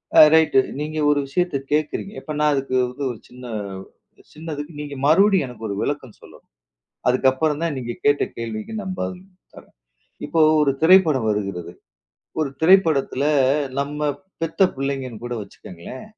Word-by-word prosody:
அ - - +8
right, 160 -3 +4 0.2
நீங்க 155 +1 -4
ஒரு 145 - +2
விஷயத்த 175 +1 0
கேக்குறீங்க. 155 +6 -1
இப்ப 155 - -6
நான் 150 0 +3
அதுக்கு 135 -2 -2
வந்து 125 +3 -6
ஒரு 115 - -9
சின்ன 125 0 -12 0.9
சின்னது 155 -2 -6 0.2
நீங்க 145 -1 -6
மறுபடியும் 190 +2 +4
எனக்கு 115 -3 -9
ஒரு 100 - -3
விளக்கம் 140 -6 -3
சொல்லணும், - - -17 0.6
அதுக்கப்றம்தான் 145 +5 +1
நீங்க 120 -2 -4
கேட்ட 145 0 +3
கேள்விக்கு 115 - -5
நான் 190 -2 -5
பதில் 180 -1 -4 0.3
தரேன். - - -16 0.5
இப்போ 165 - +1 0.2
ஒரு 140 -2 +3
திரைப்படம் 160 -8 +5
வருகிறது, 100 -5 -3 0.7
ஒரு 150 -3 -1
திரைப்படத்துல 160 -6 +3 0.5
நம்ம 145 +1 -1 0.3
பெத்த 165 +4 +3
புள்ளைங்கன்னு 135 -4 -4
கூட 120 0 -4
வச்சுக்ககுங்களேன், 95 +3 -10
145 Hz, 135 wpm, -22 LUFS, 125-160 Hz, 0.9 s, அ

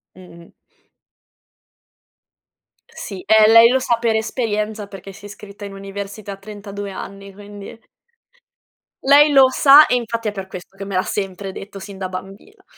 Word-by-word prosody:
Mh-mh. 170 -2 -15 2.4
Sì, 190 -3 -8
e 220 -1 +6
lei 230 +1 +8
lo 260 - +2
sa 235 -2 0
per 230 -2 0
esperienza 215 -2 -3
perché 195 0 -11
si 205 +1 -14
iscritta 205 0 -11
in 200 - -9
università 200 +1 -8
a - - -8
32 205 0 -8
anni, 195 +1 -9
quindi 205 +2 -11 1.2
lei 290 +2 +6
lo 270 -2 +7
sa 285 +3 +7
e 250 - +1
infatti 230 -2 -3
è - - 0
per 195 -2 -7
questo 190 +1 -11
che 195 - -7
me 200 - -7
l'ha 185 - +2
sempre 195 -1 -5
detto 195 +1 -10
sin 195 0 -10
da 190 -1 -4
bambina. 195 - -10
205 Hz, 155 wpm, -19 LUFS, 195-225 Hz, 2.4 s, lei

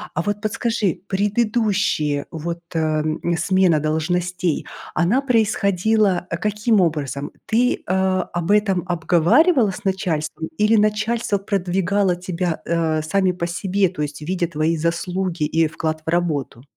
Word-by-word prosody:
А 175 - +1
вот 205 +3 -2
подскажи, 215 -3 -1
предыдущие 200 -8 0
вот, 170 +1 -4 0.2
а, 155 -1 +1 0.3
смена 185 -1 +3
должностей, 175 +3 -1 0.3
она 195 +10 +2
происходила 215 -5 +1
каким 210 0 +2
образом? 145 -5 -2
Ты, 240 +3 +1
а, 185 0 +1
об 175 +2 -1
этом 200 -4 +2
обговаривала 195 - +3
с - - -9
начальством 165 -4 -2
или 215 +2 +4
начальство 215 +1 +1
продвигало 195 -1 0
тебя, 180 -2 -3
а, 165 -2 +1
сами 185 +4 +1
по 175 -1 -3
себе, 190 +2 0
то 175 -4 -6
есть 145 -1 -4
видя 175 +2 -1
твои 160 0 0
заслуги 170 +1 -2
и 160 +2 +2
вклад 155 0 -3
в - - -3
работу? 155 -8 -1
180 Hz, 130 wpm, -21 LUFS, 165-205 Hz, 0.3 s, или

